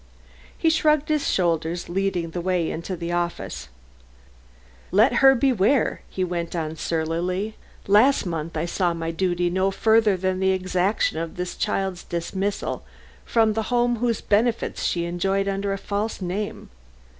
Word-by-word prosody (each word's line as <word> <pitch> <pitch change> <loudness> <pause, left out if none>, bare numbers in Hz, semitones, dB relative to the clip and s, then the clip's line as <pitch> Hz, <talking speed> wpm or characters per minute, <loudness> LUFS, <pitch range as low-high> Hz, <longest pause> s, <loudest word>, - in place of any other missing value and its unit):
He 325 - +3
shrugged 305 -2 +2
his 305 -2 +1
shoulders, 170 -1 0
leading 180 -2 -1
the 175 - -3
way 180 -2 0
into 170 +3 -4
the 170 0 -4
office. 170 - -3 1.2
"Let 215 +8 +4
her 270 0 +8
beware!" 250 -1 +2
he 185 - -2
went 170 -1 -3
on 160 -2 -3
surlily. 170 +6 -2 0.3
"Last 215 +7 +4
month 165 -2 -4
I 155 - 0
saw 175 0 0
my 165 0 -3
duty 175 0 0
no 190 +2 +2
further 220 0 +3
than 185 0 -1
the 190 0 +2
exaction 185 -1 0
of 165 0 -5
this 180 0 -4
child's 190 -2 -2
dismissal 190 +4 -3 0.4
from 225 -2 +3
the 220 - 0
home 240 -1 +2
whose 235 -1 0
benefits 225 +3 0
she 170 -1 0
enjoyed 195 +3 0
under 195 0 -1
a 195 - -1
false 205 +3 -3
name. 195 - -4
185 Hz, 150 wpm, -24 LUFS, 170-215 Hz, 1.2 s, her